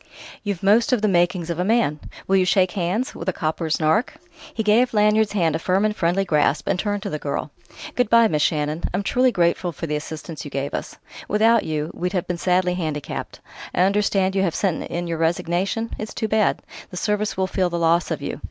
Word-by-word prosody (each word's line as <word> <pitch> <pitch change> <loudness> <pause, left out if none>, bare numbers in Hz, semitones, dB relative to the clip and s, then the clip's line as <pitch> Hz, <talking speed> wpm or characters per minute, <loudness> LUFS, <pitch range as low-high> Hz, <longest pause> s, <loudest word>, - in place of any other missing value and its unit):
You've 200 -3 -4
most 215 +6 +4
of 240 -4 +1
the - - +4
makings 175 -2 +1
of 170 - -4
a - - +2
man. 200 -8 +1 0.3
Will 195 - +2
you 185 - +4
shake 185 0 +3
hands 200 +10 -1
with - - -4
a - - +2
copper's 160 -1 -2
nark?" 160 - +1 0.4
He 220 - -3
gave 225 +3 +3
Lanyard's 210 0 +3
hand 165 -6 +1
a - - -1
firm 190 +4 +1
and 210 0 0
friendly 180 +2 +1
grasp, 150 -3 +1
and 180 - +1
turned 205 -1 -2
to - - -3
the 155 - -3
girl. 145 +1 -3 0.4
"Good 245 -4 +1
bye, 230 0 +6
Miss 150 -6 0
Shannon. 150 +1 0
I'm 200 - -1
truly 250 +5 +2
grateful 175 -2 +1
for 165 - -6
the 150 -2 -2
assistance 155 +1 -6
you 145 - -7
gave 140 0 -3
us. - - -5 0.3
Without 225 +2 +3
you, 155 0 -2
we'd 180 +2 -3
have 180 -3 -1
been 180 -1 -4
sadly 180 0 +2
handicapped. 155 -5 -4 0.3
I - - +2
understand 195 0 +2
you 195 - +2
have 175 -4 0
sent 185 -5 0
in 175 +1 -3
your 165 -1 -3
resignation? 175 +7 -1
It's 215 - -6
too 220 - -1
bad: 215 -1 +1 0.3
the 180 - -8
Service 210 +1 -1
will 190 - +1
feel 185 -1 0
the 170 - -2
loss 170 +1 +2
of - - -3
you. - - -4
185 Hz, 225 wpm, -22 LUFS, 165-210 Hz, 0.4 s, bye